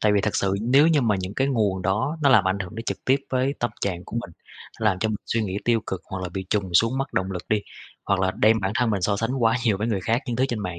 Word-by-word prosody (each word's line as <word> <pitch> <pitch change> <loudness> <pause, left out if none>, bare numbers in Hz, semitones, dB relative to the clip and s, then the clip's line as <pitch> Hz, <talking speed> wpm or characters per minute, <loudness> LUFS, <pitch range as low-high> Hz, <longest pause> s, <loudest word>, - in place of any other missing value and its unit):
Tại 105 - +3
vì 100 - +3
thật 105 - -1
sự 95 -1 +1
nếu 135 +7 +5
như 160 -3 +4
mà 110 -5 +2
những 95 +2 -5
cái 135 - +1
nguồn 105 -8 0
đó, 110 - 0
nó 140 - +5
làm 110 -8 +6
ảnh 95 +1 0
hưởng 95 -1 -6
đến 115 +1 -6
trực - - -4
tiếp 130 - +4
với 130 +2 +1
tâm 120 - 0
trạng 90 -2 -2
của - - -7
mình, 115 -6 -4 0.5
nó - - -2
làm 95 -4 +2
cho 110 - 0
mình 110 - -1
suy 115 - 0
nghĩ 95 -2 -3
tiêu 115 -1 +2
cực, 95 - -4
hoặc 95 -1 -6
là 90 - -3
bị 95 +2 -6
trùng 95 -4 -1
xuống 115 +8 +3
mất 135 0 -3
động 95 0 -1
lực 90 - -5
đi, 105 -1 +2 0.4
hoặc 100 -1 +1
là 95 0 +2
đem 110 +1 +4
bản 95 0 -1
thân 120 -1 +1
mình 100 -3 0
so 100 +3 +1
sánh 120 +4 -2
quá 115 +1 +4
nhiều 105 -5 +2
với 110 - -1
người 105 -5 -1
khác, 115 +7 0
những 120 -2 -2
thứ 130 - +2
trên 120 - -2
mạng 90 -3 -5
110 Hz, 315 wpm, -24 LUFS, 95-120 Hz, 0.5 s, làm